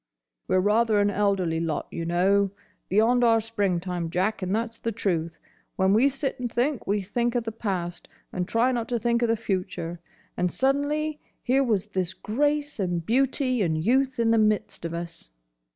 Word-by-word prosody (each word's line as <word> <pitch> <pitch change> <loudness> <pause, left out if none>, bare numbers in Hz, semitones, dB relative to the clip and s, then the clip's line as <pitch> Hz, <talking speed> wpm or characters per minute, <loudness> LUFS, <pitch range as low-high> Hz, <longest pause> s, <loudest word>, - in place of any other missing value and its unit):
"We're 185 - +3
rather 215 +2 +3
an 205 0 +3
elderly 195 -5 +1
lot, 165 -2 -2
y'know. 180 +4 +2 0.4
Beyond 230 +5 +3
our 230 -1 +5
springtime, 180 -6 -2
Jack, 190 +5 0
and 185 +2 0
that's 230 0 -3
the 230 - -2
truth. 170 -6 -2 0.4
When 190 +1 +3
we 245 +6 +5
sit 275 0 -3
and 245 -2 -3
think, 250 +3 -1
we 205 0 0
think 235 +5 -1
of 240 - +1
the 225 - -4
past, 185 -6 -4 0.3
and 180 -1 -2
try 235 +3 +2
not 235 -2 -2
to 240 - +1
think 235 +1 +1
of 235 - +2
the 230 - +3
future. 180 -4 -3 0.4
And, 180 0 0
suddenly, 290 +3 0 0.2
here 265 +2 +3
was 215 -6 +1
this 190 -3 -3
Grace 290 +4 -1
and 175 -3 -1
Beauty 255 - +1
and 160 -4 +1
Youth 260 +9 +1
in 230 -1 +2
the 230 - +4
midst 215 -5 0
of 170 0 -3
us. 170 - -6
215 Hz, 180 wpm, -26 LUFS, 180-240 Hz, 0.4 s, our